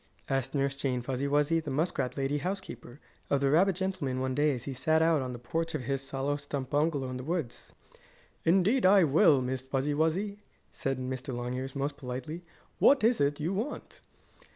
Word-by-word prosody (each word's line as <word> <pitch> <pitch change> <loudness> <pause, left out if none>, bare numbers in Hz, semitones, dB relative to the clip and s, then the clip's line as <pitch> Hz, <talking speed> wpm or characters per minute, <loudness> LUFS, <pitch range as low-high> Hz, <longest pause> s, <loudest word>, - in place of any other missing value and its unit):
asked 135 +1 -1
Nurse 140 0 0
Jane 130 -2 -1
Fuzzy 130 +2 -2
Wuzzy, 150 +3 +2
the 160 -2 -6
muskrat 140 -2 -1
lady 140 +2 0
housekeeper, 180 -6 -6 0.3
of 140 - +2
the 135 0 +2
rabbit 185 +4 +4
gentleman 185 -9 -2
one 130 0 -1
day, 145 +3 +2
as 120 - -7
he 135 - -4
sat 155 +5 +2
out 160 -2 +3
on 130 -1 -4
the 120 - -6
porch 165 +7 -3
of - - -3
his 135 +2 -3
hollow 140 +2 -1
stump 140 -2 -5
bungalow 145 -2 +1
in 125 - -4
the 130 - -6
woods. 160 -5 -4 0.7
"Indeed 195 +9 +3
I 190 0 +6
will, 145 -2 +5
Miss 130 +1 -3
Fuzzy 135 +2 0
Wuzzy," 185 +7 0 0.3
said 135 -1 -2
Mr. 130 +1 -4
Longears, 125 +2 -4
most 140 +1 -2
politely. 135 +4 -6 0.4
"What 275 -4 +5
is 230 -3 +3
it 145 +1 +1
you 165 +5 -1
want?" 225 +10 -5
140 Hz, 190 wpm, -30 LUFS, 130-165 Hz, 0.7 s, I